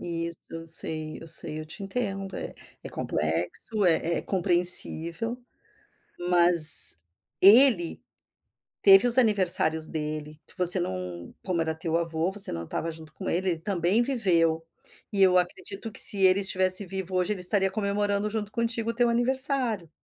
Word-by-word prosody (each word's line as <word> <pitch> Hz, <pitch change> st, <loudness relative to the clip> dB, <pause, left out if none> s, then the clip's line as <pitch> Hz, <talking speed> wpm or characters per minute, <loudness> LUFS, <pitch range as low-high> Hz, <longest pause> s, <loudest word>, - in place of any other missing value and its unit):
Isso, 170 Hz, -1 st, -7 dB
eu 165 Hz, 0 st, -10 dB
sei, 155 Hz, -1 st, -4 dB
eu -, -, -13 dB
sei, 155 Hz, -1 st, -4 dB
eu 155 Hz, -, -11 dB
te 180 Hz, +6 st, -11 dB
entendo 195 Hz, -2 st, -7 dB
é -, -, -9 dB, 0.3 s
é -, -, -9 dB
complexo, 85 Hz, -, -5 dB
é 170 Hz, -1 st, -1 dB
é -, -, -8 dB
compreensível, 175 Hz, +2 st, +2 dB, 0.9 s
mas 170 Hz, -, +6 dB, 0.4 s
ele 205 Hz, -4 st, +4 dB, 0.8 s
teve 195 Hz, +3 st, +6 dB
os 240 Hz, +1 st, +3 dB
aniversários 180 Hz, -8 st, +1 dB
dele, 150 Hz, -1 st, -8 dB
que -, -, -9 dB
você 180 Hz, 0 st, +7 dB
não, 90 Hz, -, -8 dB
como 180 Hz, -3 st, -4 dB
era 160 Hz, -1 st, -4 dB
teu 160 Hz, +1 st, -5 dB
avô 165 Hz, 0 st, -4 dB
você 200 Hz, 0 st, +2 dB
não 85 Hz, 0 st, -7 dB
estava 165 Hz, -, -6 dB
junto 160 Hz, -1 st, -14 dB
com -, -, -10 dB
ele, 185 Hz, +2 st, -3 dB
ele 165 Hz, -, -6 dB
também 185 Hz, +4 st, -2 dB
viveu, 170 Hz, -11 st, -2 dB, 0.5 s
e 200 Hz, -2 st, -2 dB
eu 185 Hz, -1 st, +3 dB
acredito 195 Hz, +4 st, -7 dB
que -, -, +2 dB
se 205 Hz, -, +9 dB
ele 185 Hz, +1 st, +2 dB
estivesse 185 Hz, 0 st, -2 dB
vivo 190 Hz, 0 st, -7 dB
hoje 185 Hz, +3 st, -2 dB
ele 190 Hz, -, -9 dB
estaria 195 Hz, +1 st, +2 dB
comemorando 205 Hz, 0 st, -4 dB
junto 210 Hz, -1 st, -7 dB
contigo 230 Hz, 0 st, -4 dB
o -, -, -16 dB
teu 240 Hz, 0 st, 0 dB
aniversário. 245 Hz, -, +1 dB
185 Hz, 160 wpm, -24 LUFS, 165-205 Hz, 0.9 s, se